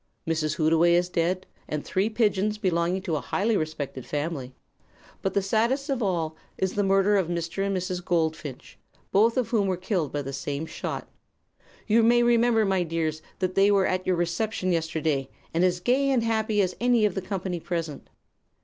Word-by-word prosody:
Mrs. 155 -2 0
Hootaway 165 +1 +4
is 175 +1 +2
dead, 180 +2 0 0.2
and 150 -1 -4
three 195 +3 0
pigeons 215 -2 +1
belonging 180 -2 0
to 165 -6 -1
a - - -3
highly 210 - 0
respected 155 -6 -3
family; 145 -3 -4 0.7
but 195 - -2
the 200 - +2
saddest 235 +8 +1
of 265 -2 -1
all 170 -6 -1 0.2
is 190 -1 -1
the 205 - +1
murder 195 +1 +3
of 190 -4 +1
Mr. 170 +2 -2
and 195 -1 0
Mrs. 180 -1 -3
Goldfinch, 160 -6 -2 0.3
both 225 +5 +4
of 250 - +1
whom 210 -4 +2
were 185 -1 0
killed 180 - -1
by 145 -1 -2
the 135 0 -6
same 140 +3 -3
shot. - - -5 0.8
You 225 +1 +4
may 240 +1 +5
remember, 235 -2 +4
my 190 -2 +1
dears, 160 -2 -2 0.2
that 185 -1 -1
they 195 +1 +4
were 200 -2 +4
at 185 0 -1
your 185 - +3
reception 180 +3 -1
yesterday, 160 -4 -1 0.2
and 165 +2 +2
as 180 -1 +2
gay 260 +9 +2
and 255 -4 +2
happy 220 -2 +1
as 180 -1 -2
any 240 -3 +4
of 205 - +1
the 190 - -3
company 185 -2 -3
present. 165 -3 -4
185 Hz, 185 wpm, -26 LUFS, 165-210 Hz, 0.8 s, may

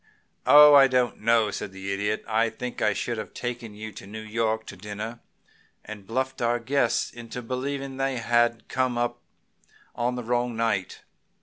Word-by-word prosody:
"Oh, 150 0 +9
I 140 -1 +8
don't 125 -3 +1
know," 115 -1 +3
said 95 - -5
the 95 +1 -5
Idiot. 105 +2 -2
"I 110 +2 +2
think 125 +2 -6
I 105 - +3
should 115 +3 -3
have - - -8
taken 120 -3 -5
you 110 +1 -7
to 100 -1 -11
New 110 +2 -7
York 110 0 -1
to - - -9
dinner, 105 +4 -6 0.7
and 105 -2 -9
bluffed 130 +3 -2
our 120 0 +2
guests 120 0 0
into 120 +1 -8
believing 135 +2 -4
they 135 -1 -1
had 120 0 +1
come 130 -2 0
up 120 0 -1 0.7
on 120 +1 -1
the 125 - -4
wrong 120 0 -1
night. 110 -5 -1
115 Hz, 175 wpm, -26 LUFS, 110-125 Hz, 0.7 s, Oh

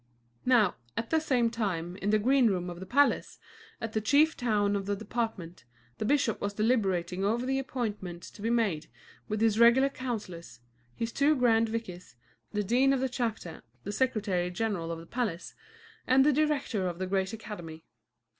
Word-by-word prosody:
Now, 230 -7 +4 0.2
at 230 - -3
the 320 - +4
same 250 -7 +1
time, 180 -7 -2
in 200 0 -2
the 215 - +4
green 255 +3 +4
room 180 -3 -1
of 175 - -9
the 190 - -8
palace, 285 +6 +2 0.4
at 225 -1 -5
the 220 - 0
chief 290 +8 +4
town 210 -4 +1
of 195 -1 -3
the 205 - 0
department, 215 -5 -4 0.4
the - - -1
bishop 275 -3 +1
was 205 0 -3
deliberating 195 -5 0
over 230 +5 0
the 270 +1 0
appointments 210 -10 -5
to 205 - -14
be 225 - -1
made 210 -10 0 0.4
with 215 0 -2
his 225 -1 +3
regular 240 +4 +6
councillors, 205 - -6 0.4
his 230 0 -3
two 290 +5 +3
grand 230 -3 +3
vicars, 190 - -6 0.4
the 210 -1 -1
dean 255 +6 +3
of 270 - +1
the 265 0 0
chapter, 225 -9 -4 0.2
the 205 - -4
secretary 205 -7 0
general 180 -3 -2
of 165 - -4
the 165 - -10
palace, 210 -6 -3 0.5
and 265 +1 +5
the 300 - +4
director 280 -9 0
of 175 -1 -4
the 185 - -2
great 190 +1 -1
academy. 175 -8 -8
220 Hz, 180 wpm, -29 LUFS, 190-250 Hz, 0.5 s, regular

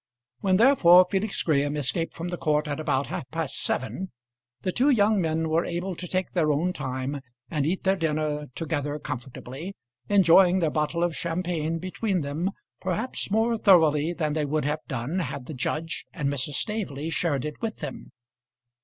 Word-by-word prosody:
When 190 -2 +3
therefore 185 -8 +7
Felix 195 +1 0
Graham 145 -2 +1
escaped 165 +4 -1
from 170 +2 -4
the 175 - -3
court 150 -1 +1
at 145 +1 -3
about 140 -3 0
half 125 - -5
past 160 -3 -3
seven, 180 +9 -2 0.5
the 185 - 0
two 260 +9 +2
young 215 -5 +4
men 160 -1 0
were 160 +2 +2
able 175 +2 -3
to 180 +1 -7
take 185 +1 -1
their 155 -4 +2
own 170 +5 +1
time 135 0 -3 0.3
and 150 -2 0
eat 185 +4 -1
their 190 0 +2
dinner 150 -2 -1
together 145 -2 -2
comfortably, 135 +6 -7 0.3
enjoying 185 -2 +6
their 165 -4 +1
bottle 155 +3 0
of 175 -2 0
champagne 165 +1 -2
between 185 +2 -1
them 150 +6 -2 0.3
perhaps 195 +7 -2
more 225 +3 +2
thoroughly 160 -6 +5
than 155 -3 -1
they 155 0 0
would 150 0 -1
have 150 +1 0
done 135 +6 -2
had 140 -5 -4
the 155 - -7
judge 155 +5 -3
and 150 -6 -2
Mrs. 140 +1 -2
Staveley 165 -7 -3
shared 150 -5 0
it 150 -1 -6
with 225 -2 -2
them. 150 -5 -7
160 Hz, 175 wpm, -26 LUFS, 145-185 Hz, 0.5 s, therefore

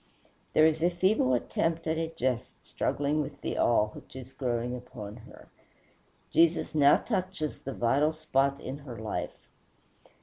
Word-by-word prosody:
There 155 - +6
is 160 0 +2
a 175 - +4
feeble 175 -7 +2
attempt 165 +6 -1
at 160 0 0
a 165 - -1
jest 130 -6 -3
struggling 145 +2 0
with 140 0 -6
the - - -3
awe 110 -2 +3
which 105 - -13
is 130 0 -9
growing 125 -2 -2
upon 120 -4 -8
her. 110 - -14 0.8
Jesus 165 -1 +3
now 145 -2 +6
touches 185 -8 -3
the 135 - -6
vital 140 +7 +2
spot 140 -3 0
in 135 +2 -6
her 130 -5 -9
life. 105 -5 -5
140 Hz, 155 wpm, -29 LUFS, 125-160 Hz, 0.8 s, There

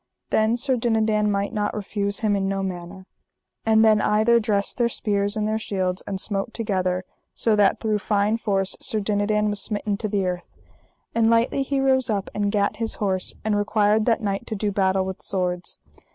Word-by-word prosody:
Then 220 +2 +2
Sir 255 +1 0
Dinadan 220 -2 +1
might 200 +2 -1
not 210 -1 -1
refuse 200 -1 -1
him 210 -2 +2
in 195 -1 0
no 195 0 -1
manner. 185 0 -6 0.6
And 220 0 +5
then 215 -1 +5
either 220 +3 +3
dressed 205 -1 0
their 235 -1 +3
spears 205 -1 -1
and 210 0 0
their 215 0 0
shields, 185 -4 -2
and 195 -1 -3
smote 200 +3 -2
together, 185 -4 -1 0.3
so 225 -2 +2
that 205 -2 +3
through 215 -2 0
fine 210 +2 +1
force 195 -3 0
Sir 220 - -1
Dinadan 210 +1 +1
was 205 -1 0
smitten 205 -1 -2
to 215 - -3
the 200 -2 0
earth; 180 -1 -5 0.6
and 225 -1 +3
lightly 230 +4 +2
he 275 0 -1
rose 260 -2 +2
up 200 -3 -2
and 205 -1 0
gat 200 -1 0
his 225 0 -2
horse, 190 -3 -2
and 215 -1 +1
required 210 +1 +2
that 230 -1 +2
knight 200 +2 -2
to 220 - -3
do 205 0 -1
battle 190 -1 +1
with 190 -1 -6
swords. 180 -2 -2
210 Hz, 195 wpm, -23 LUFS, 195-220 Hz, 0.6 s, And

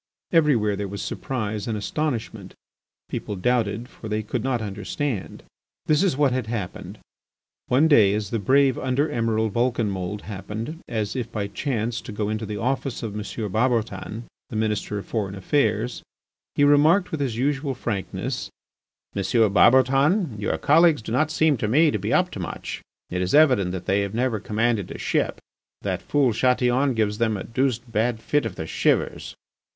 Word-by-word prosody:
Everywhere 130 -11 +3
there 100 0 -3
was 100 +1 -5
surprise 110 -5 -3
and 110 -2 -1
astonishment. 110 -4 -3 0.5
People 105 - -4
doubted, 115 +2 0
for 110 - -10
they 105 0 -1
could 105 - -3
not 130 -2 0
understand. 105 +3 -4 0.4
This 150 +1 +3
is 185 -8 +2
what 145 -3 +3
had 125 -3 -2
happened: 105 -6 -5 0.7
One 140 +6 +4
day 105 -10 +5
as 105 -1 -3
the 115 - 0
brave 135 +5 +3
Under 130 +4 0
Emiral 110 -2 0
Vulcanmould 105 -4 -1
happened, 105 +9 -6
as 110 -1 -2
if 125 -4 -3
by 105 -1 -2
chance, 115 +1 -2
to - - -8
go 105 0 -2
into 110 0 -3
the 105 0 -4
office 130 +2 -2
of 110 -3 -4
M. 105 - -4 0.3
Barbotan, 110 -1 -1 0.3
the - - -7
Minister 105 -1 -1
of 100 - -6
Foreign 100 -4 -3
Affairs, 110 +2 0 0.5
he 145 - +3
remarked 155 +6 +5
with 160 - -2
his 130 -5 -1
usual 135 +1 0
frankness: 105 -6 -3 0.7
"M. 100 - 0 0.3
Barbotan, 135 - +4
your 105 - -1
colleagues 160 -4 +4
do 110 - -6
not 155 +6 +2
seem 155 -2 +2
to 110 - -1
me 150 +7 +4
to - - -1
be - - -3
up - - +2
to - - -7
much; - - -5 0.3
it 90 +1 -1
is 90 +6 +1
evident 130 -12 +5
that 90 -1 -5
they 100 +1 +2
have 100 +1 -3
never 120 -2 0
commanded 110 -1 0
a - - -7
ship. - - -1 0.4
That - - -2
fool 140 -5 +2
Chatillon 125 +2 +2
gives 105 -2 0
them 110 -2 +1
a - - -5
deuced 125 -1 -1
bad 110 +1 0
fit 125 +3 0
of 95 - -8
the 80 - -5
shivers." - - 0
115 Hz, 175 wpm, -24 LUFS, 105-135 Hz, 0.7 s, day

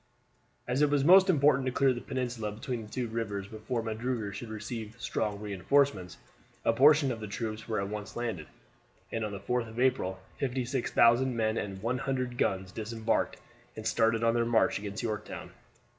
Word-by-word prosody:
As 125 +3 0
it 150 - +5
was 145 -1 +2
most 190 +3 +8
important 140 -5 +4
to - - +1
clear 135 0 +3
the 120 - -6
peninsula 125 -5 -3
between 115 +3 -4
the 105 - -10
two 125 -2 -2
rivers 110 -3 -3
before 110 +3 -4
Magruder 110 -1 -3
should 110 +4 -7
receive 110 0 -6
strong 105 -3 -2
reinforcements, 105 0 +1 0.5
a 115 - +4
portion 140 +2 +5
of 115 - -4
the 110 - -6
troops 110 +1 -4
were 110 -3 -1
at 100 - -2
once 105 0 -6
landed, 115 -10 -3 0.6
and 115 - -2
on 105 - -3
the 100 - -5
4th 115 +3 -1
of 110 +2 -8
April 125 -8 +1 0.2
56,000 125 -1 +2
men 110 -1 +1
and 100 -2 -4
100 125 0 -2
guns 95 -1 0
disembarked 110 +1 -1 0.4
and - - -7
started 115 0 +2
on 115 0 +4
their 120 0 +2
march 115 -3 +2
against 100 +2 -5
Yorktown. 110 -2 -4
115 Hz, 175 wpm, -30 LUFS, 105-130 Hz, 0.6 s, most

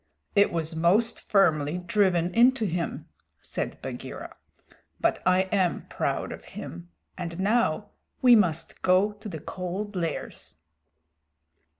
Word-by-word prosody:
"It 200 - +5
was 165 -1 -2
most 185 +8 +2
firmly 160 -5 +2
driven 180 -1 +1
into 245 0 +4
him," 170 -2 -3 0.3
said - - -4
Bagheera. - - -7 0.6
"But - - +1
I 185 0 +5
am 185 -4 +1
proud - - -2
of - - -8
him, 85 +1 -9 0.3
and 170 0 -5
now 205 -2 +1 0.3
we 245 -2 +7
must 170 -7 +1
go 185 +3 +4
to 210 +1 -9
the 165 - -5
Cold 185 +6 -5
Lairs." 165 - -4
185 Hz, 120 wpm, -27 LUFS, 170-205 Hz, 0.6 s, we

